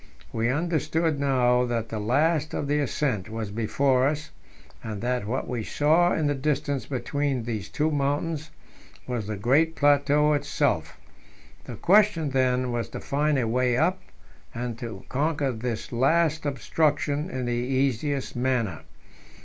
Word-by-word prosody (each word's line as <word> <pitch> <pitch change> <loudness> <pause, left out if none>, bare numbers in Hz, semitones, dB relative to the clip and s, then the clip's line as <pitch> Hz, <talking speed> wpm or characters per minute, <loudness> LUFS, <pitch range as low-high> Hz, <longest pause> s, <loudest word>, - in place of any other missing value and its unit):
We 115 +1 0
understood 160 +1 0
now 125 -3 +3
that 115 -2 -2
the 110 - -4
last 150 +8 +1
of 145 - -2
the 145 +1 +1
ascent 125 -7 -1
was 110 -2 -4
before 130 +4 +2
us, 150 +1 -3 0.5
and 110 -3 -5
that 125 -3 -1
what 130 +4 -2
we 120 -3 -3
saw 160 +8 +3
in 155 - 0
the 145 - +2
distance 145 0 -1
between 135 0 -1
these 110 -4 -4
two 155 +1 0
mountains 145 +2 -1 0.6
was 120 -5 -3
the 105 -1 -3
great 145 +10 +2
plateau 145 +1 +3
itself. 145 0 0 0.7
The - - -7
question, 190 -6 +3
then, 130 -1 +1
was 120 -1 -2
to - - -6
find 145 +1 0
a 120 -3 0
way 125 +1 +1
up, - - +1 0.5
and 120 0 -3
to 110 -5 -7
conquer 145 0 0
this 115 -1 -4
last 155 +5 +2
obstruction 145 +3 0
in 130 -8 -3
the 120 - -1
easiest 130 +2 -1
manner. 120 - -1
135 Hz, 150 wpm, -26 LUFS, 120-150 Hz, 0.7 s, now